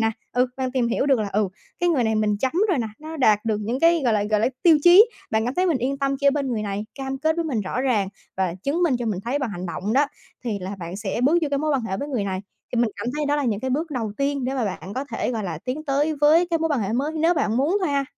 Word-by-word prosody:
nè, 225 0 +2 0.2
ừ, 250 +1 +3
bạn 260 -1 -2
tìm 250 -3 +1
hiểu 235 - 0
được 270 -3 +4
là, 210 - -1
ừ, 205 -1 +1 0.3
cái 350 - +2
người 285 -8 +2
này 220 0 +1
mình 215 -1 +1
chấm 265 - 0 0.2
rồi 360 -7 +2
nè, 230 - -1
nó 315 +1 -8
đạt 215 -7 +3
được 220 -2 +1
những 235 +5 -2
cái, 335 0 +5
gọi 235 - +3
là, 210 -1 +2
gọi 210 0 +1
là, 225 - +3
tiêu 325 -3 +6
chí. 355 +5 +9 0.3
Bạn 220 0 +1
cảm 250 +3 -2
thấy 365 +1 +2
mình 325 -7 +2
yên 270 +3 -1
tâm 275 0 0
khi 280 - +1
ở - - +8
bên 280 -1 -1
người 215 -2 -1
này, 205 +1 -3
cam 270 -1 -4
kết 315 +3 +1
với 335 - -1
mình 260 -9 -1
rõ 205 +6 -3
ràng 230 -7 +1 0.3
và 185 -3 0
chứng 305 +6 0
minh 300 -8 +3
cho 240 - -3
mình 205 -4 -1
thấy 260 +5 0
bằng 265 -5 -2
hành 180 -1 -5
động 190 +4 -3
đó, 280 +4 +4 0.4
thì 220 -4 -2
là 190 +2 -5
bạn 170 +1 -6
sẽ 210 +2 -3
bước 320 +5 +4
vô 305 - +1
cái 280 - +1
mối 305 +2 0
quan 275 -4 +1
hệ 190 -4 -3
với 285 - -4
người 245 -8 -1
này. 190 -1 -2 0.3
Thì 240 - +1
mình 235 -2 +2
cảm - - -5
thấy 300 -1 -1
đó 290 +1 +2
là 290 - 0
những 215 -4 0
cái 260 - -2
bước 310 +5 -1
đầu 225 -7 -3
tiên 280 -1 -1
để 260 +2 -1
mà 255 -4 0
bạn 195 0 -5
có 265 - -2
thể, - - -1
gọi 220 -3 -3
là, 165 -4 -4
tiến 285 +5 -3
tới 290 +2 +1
với 320 +4 +5
cái 330 - +2
mối 325 0 0
quan 290 -6 0
hệ 200 0 -2
mới 280 +6 0
nếu 325 +3 +2
bạn 235 -7 0
muốn 305 +10 +2
thôi 370 - 0
ha. 280 -1 +1
260 Hz, 320 wpm, -23 LUFS, 215-295 Hz, 0.4 s, chí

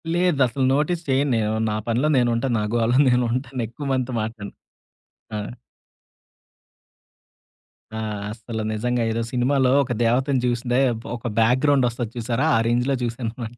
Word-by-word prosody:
లేదసలు. 140 -7 +2
Notice 160 +4 0
చేయను 135 +1 +2
నేను. 110 -1 0 0.2
నా 105 - -1
పనిలో 120 +6 +1
నేను 120 -1 +3
ఉంటాను. 120 +1 0
నా - - -1
గోలలో 120 +1 +2
నేను 125 0 +3
ఉంటాను 130 0 -3
ఎక్కువ 120 +6 -8
మందితో 130 -1 -1
మాట్లాడను. 110 -2 -6 0.8
ఆ! - - -2 2.6
ఆ! - - -3 0.4
అసలు 115 0 -6
నిజంగా 120 +2 -1
ఏదో 115 +1 -1
సినిమాలో 130 +1 +2
ఒక 125 - -6
దేవతని 130 +3 +2
చూస్తే 120 +1 0 0.4
ఒక 120 - -6
బ్యాక్‌గ్రౌండ్ 130 +3 +3
వస్తది 120 -1 -5
చూసారా 120 +5 0
ఆ - - +4
రేంజ్‌లో 125 +3 +1
చూసాననమాట. 120 0 -5
125 Hz, 135 wpm, -23 LUFS, 115-135 Hz, 2.6 s, ఆ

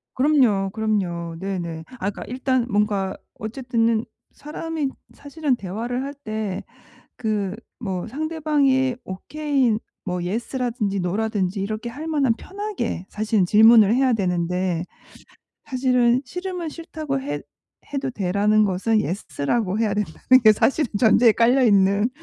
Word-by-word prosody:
그럼요, 255 -9 +3
그럼요. 185 -6 -2
네네. 175 -4 -4 0.2
아 190 - -1
그러니까 - - -8
일단 255 0 0
뭔가 205 -2 0 0.2
어쨌든 230 +1 -1
는 230 -1 +1 0.3
사람이 310 -1 -4 0.2
사실은 285 -1 -2
대화를 235 +6 -4
할 280 +1 -5
때 215 -8 -4 0.5
그 210 -4 -1 0.2
뭐 190 -6 -4
상대방이 285 -2 +1
오케이 265 +3 0 0.3
뭐 180 -2 -2
예스 220 +9 -3
라든지 235 -6 -1
노 180 +2 -1
라든지 210 -3 -1
이렇게 215 +4 -3
할 290 +7 -7
만한 285 -7 +2
편하게 390 - -4
사실은 215 -2 +1
질문을 220 +2 +7
해야 260 0 +3
되는데. 180 -3 0 0.8
사실은 250 -2 +2
"싫으면 360 +2 -4
싫다고 310 -4 -4
해 285 - -3 0.5
해도 275 -1 -2
돼."라는 210 0 +2
것은 205 +3 +1
예스 195 -4 -5
라고 200 +5 0
해야 220 -2 +1
된다는 210 +6 +3
게 215 - +9
사실은 270 +6 +1
전제에 225 0 +5
깔려 245 +5 +3
있는 200 0 +4
225 Hz, 290 characters per minute, -23 LUFS, 200-265 Hz, 0.8 s, 게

